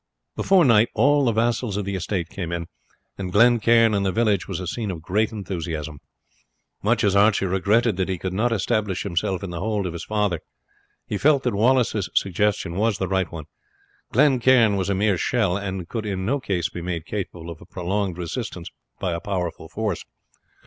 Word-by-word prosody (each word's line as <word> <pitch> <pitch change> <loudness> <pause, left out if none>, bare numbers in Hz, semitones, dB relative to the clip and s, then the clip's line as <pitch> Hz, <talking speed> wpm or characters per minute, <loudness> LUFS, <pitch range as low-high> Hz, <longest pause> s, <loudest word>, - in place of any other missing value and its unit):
Before 190 -4 +4
night 115 -2 +5
all 140 +5 +4
the 120 - +3
vassals 115 -1 0
of 105 - -2
the 100 - -3
estate 90 -1 -2
came 85 -1 -5
in, 85 -1 -3 0.5
and 95 -2 -4
Glen 120 +4 +5
Cairn 115 0 +4
and 100 -1 +1
the 95 - +1
village 105 -2 +1
was 95 -3 -4
a 90 - -5
scene 105 +4 -3
of 90 -4 -4
great 105 +6 +1
enthusiasm. 85 -7 -5 0.8
Much 115 +3 +1
as 100 -1 +3
Archie 100 0 +4
regretted 100 +4 +2
that 95 0 -1
he 95 - -1
could 90 +1 -4
not 115 +5 +1
establish 105 -3 0
himself 95 0 -1
in 95 - -5
the 85 - -5
hold 105 0 -1
of 90 - -3
his 85 - -6
father, 105 -5 0 0.7
he 105 - -3
felt 145 -2 +4
that 125 - 0
Wallace's 110 -2 +2
suggestion 100 -2 0
was 110 -1 +1
the 95 - -2
right 95 -1 0
one. 80 -3 -7 0.7
Glen 135 +1 +4
Cairn 120 -4 +5
was 95 -1 -1
a 100 - +1
mere 100 -2 +1
shell, 110 -8 +1
and 95 -3 -4
could 110 0 -4
in 95 -2 -3
no 140 +7 +1
case 90 -9 -1
be 85 +1 -7
made 85 -2 -4
capable 90 -4 -5
of 80 - -11
a 90 - -14
prolonged 95 0 -2
resistance 90 0 -5 0.3
by 90 - -1
a 85 - -2
powerful 90 -4 -4
force. 105 -5 -3
100 Hz, 200 wpm, -23 LUFS, 90-110 Hz, 0.8 s, night